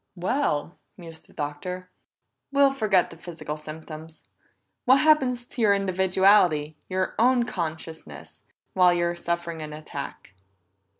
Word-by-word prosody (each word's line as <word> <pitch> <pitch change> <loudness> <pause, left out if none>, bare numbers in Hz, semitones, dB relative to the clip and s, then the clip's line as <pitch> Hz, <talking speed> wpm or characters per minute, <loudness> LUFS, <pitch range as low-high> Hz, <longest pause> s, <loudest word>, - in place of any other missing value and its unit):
"Well," 180 - -1 0.2
mused 165 -3 -11
the - - -20
Doctor, 180 +5 -5 0.6
"we'll 280 0 +5
forget 215 -8 +2
the 165 - -11
physical 165 -3 -6
symptoms. 155 +1 -10 0.6
What 265 +2 +6
happens 265 -6 +3
to 240 - -6
your 205 -2 +5
individuality, 190 -5 +3
your 185 0 -1
own 245 +1 +4
consciousness, 160 -6 -6 0.3
while 180 -1 +5
you're 175 0 0
suffering 170 -1 -3
an 150 -1 -6
attack?" 150 -8 -8
180 Hz, 120 wpm, -25 LUFS, 160-210 Hz, 0.6 s, What